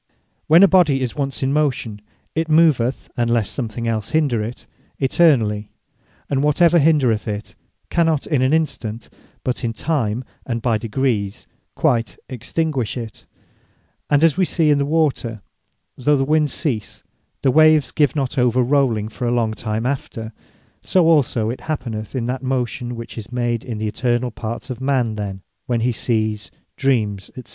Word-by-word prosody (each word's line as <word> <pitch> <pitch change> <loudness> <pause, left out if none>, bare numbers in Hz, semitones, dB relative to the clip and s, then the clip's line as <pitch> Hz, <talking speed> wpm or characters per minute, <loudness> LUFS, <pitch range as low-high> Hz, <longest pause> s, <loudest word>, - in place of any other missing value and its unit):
When 165 +5 +7
a - - +9
Body 165 -8 +4
is 125 -3 -2
once 135 -5 -2
in 135 +1 +1
motion, 130 -8 -1 0.3
it 160 0 -1
moveth 155 -6 +3
(unless 120 -3 +1
something 115 -2 -4
els 110 -3 -2
hinder 145 -8 +2
it) 115 +3 -7 0.3
eternally; 125 -8 +2 0.6
and 135 -1 0
whatsoever 170 +4 +4
hindreth 140 -9 +2
it, 105 0 -5 0.4
cannot 165 -4 +2
in 145 -5 +1
an 130 +1 +2
instant, 140 -8 -2 0.3
but 125 0 -2
in 115 -1 -1
time, 125 -3 -1 0.2
and 115 -2 -3
by 115 -2 0
degrees 110 -3 -1 0.3
quite 115 -6 +1
extinguish 130 0 -2
it: 115 -3 -8 0.8
And 145 +1 +3
as 165 -1 +4
wee 190 - +3
see 165 -3 +2
in 145 - +3
the 140 - 0
water, 140 -9 0 0.5
though 145 +3 +2
the 135 - +1
wind 150 0 +2
cease, 125 - -4 0.4
the 135 - +4
waves 155 0 +5
give 150 -1 +2
not 135 -1 -1
over 125 0 +3
rowling 125 -5 +1
for 120 +2 -4
a - - +1
long 115 -2 +1
time 110 +1 -3
after; 115 -4 -4 0.5
so 185 -3 +2
also 125 -8 +2
it 125 - -7
happeneth 120 -8 -4
in 120 -3 -1
that 125 +1 -3
motion, 125 -2 -2
which 115 0 -7
is 110 +1 -10
made 120 -2 -1
in 115 -4 -5
the 110 0 -2
internall 120 0 -1
parts 115 +4 -5
of 125 0 -6
a - - -5
man, 130 -5 +1
then, 100 -3 -5 0.2
when 120 -2 0
he 125 +2 +2
Sees, 110 -2 -1 0.3
Dreams, 110 -8 0
&c. 130 - -8
125 Hz, 170 wpm, -20 LUFS, 115-145 Hz, 0.8 s, a